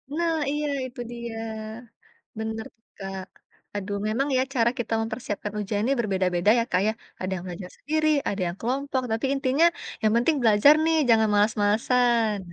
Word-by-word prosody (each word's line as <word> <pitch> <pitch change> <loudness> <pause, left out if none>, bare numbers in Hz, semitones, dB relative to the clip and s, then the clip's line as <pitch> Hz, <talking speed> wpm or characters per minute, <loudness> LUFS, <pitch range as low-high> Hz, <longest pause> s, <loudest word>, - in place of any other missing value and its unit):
Nah, 335 0 +1 0.2
iya 295 0 -1 0.2
itu 250 0 -10
dia. 235 -1 -6 1.0
Bener, 220 +1 -4 0.3
Kak. 195 -1 -6 0.5
Aduh, 200 0 -3
memang 265 +6 0
ya 255 - +3
cara 235 -2 +3
kita 235 -1 -3
mempersiapkan 220 -2 -4
ujian 205 0 -2
ini 275 - +2
berbeda-beda 190 -3 +1
ya, - - +3
Kak, 180 - +2
ya. - - +2 0.3
Ada 185 - -3
yang 175 - -6
belajar 180 +1 -7
sendiri, 310 +1 0 0.2
ada 200 - -2
yang 175 - -4
kelompok, 265 +2 -1
tapi 225 +4 0
intinya, 275 +3 +2 0.4
yang 215 0 +3
penting 290 +6 +3
belajar 225 +6 +6
nih, 325 0 +3
jangan 220 -1 +5
malas-malasan. 220 +2 +2
225 Hz, 160 wpm, -25 LUFS, 205-260 Hz, 1.0 s, belajar